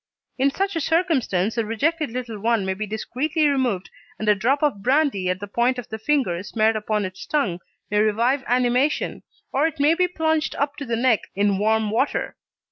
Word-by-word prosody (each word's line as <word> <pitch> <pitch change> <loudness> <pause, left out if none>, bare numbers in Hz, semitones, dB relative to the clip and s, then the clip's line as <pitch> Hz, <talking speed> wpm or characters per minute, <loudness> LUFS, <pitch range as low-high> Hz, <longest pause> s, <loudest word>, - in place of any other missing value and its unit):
In 270 +2 +4
such 390 +6 -2
a 325 - 0
circumstance 270 - +1
the 230 - 0
rejected 295 +8 0
little 230 -3 -5
one 225 -1 +1
may 190 - 0
be 210 +3 -5
discreetly 280 +9 -1
removed, 250 -10 0 0.3
and 215 - -4
a 210 - +6
drop 255 +9 0
of 270 -10 +1
brandy 255 -7 +2
on 185 - 0
the 200 - -6
point 240 +5 +1
of 245 -1 -7
the 220 - -5
finger 220 -9 0
smeared 220 +2 +1
upon 215 -1 -1
its 185 0 -7
tongue 215 - 0 0.3
may 210 - +2
revive 230 +6 +2
animation, 250 +4 +1 0.3
or 290 +4 +3
it 320 - -7
may 295 +3 +5
be 360 +2 +2
plunged 320 -3 0
up 285 +1 -1
to 285 - -5
the 235 -2 -1
neck 235 -2 +2
in 200 0 +1
warm 220 0 +1
water. 235 +6 0
240 Hz, 200 wpm, -23 LUFS, 210-285 Hz, 0.3 s, a